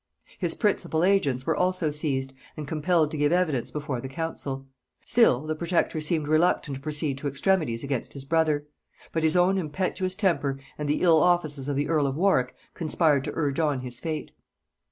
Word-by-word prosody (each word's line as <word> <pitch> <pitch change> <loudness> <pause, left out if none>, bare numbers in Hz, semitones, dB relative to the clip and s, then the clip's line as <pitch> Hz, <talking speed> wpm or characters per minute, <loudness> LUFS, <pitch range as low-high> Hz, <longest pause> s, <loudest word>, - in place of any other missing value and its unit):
His 175 -4 -1
principal 175 -6 0
agents 170 -10 +2
were - - +1
also 180 -4 +1
seized, 135 -3 -2 0.2
and 150 -2 -5
compelled 155 0 +1
to 155 - -4
give 145 +1 +2
evidence 160 -9 +1
before 145 -5 -4
the 130 - -6
council. 135 -2 -4 0.4
Still 155 - +4
the 155 - -1
protector 165 -1 0
seemed 155 -1 0
reluctant 155 -2 +2
to 135 - -7
proceed 150 -2 -1
to 145 - -3
extremities 140 -4 0
against 135 -3 -3
his 135 -1 -7
brother; 155 -1 +1 0.5
but 160 - -1
his 160 +1 +3
own 185 +2 +3
impetuous 185 +3 -2
temper 165 -9 0 0.2
and 150 -1 -4
the 150 - 0
ill 165 -3 +5
offices 155 -6 +1
of 145 - -1
the 145 +1 0
earl 150 -3 +2
of 135 - -2
Warwick 160 -8 +2 0.2
conspired 155 -3 +1
to - - -3
urge 145 -2 -1
on 145 -5 +1
his 125 -1 -7
fate. 155 -2 -4
155 Hz, 185 wpm, -26 LUFS, 140-170 Hz, 0.5 s, ill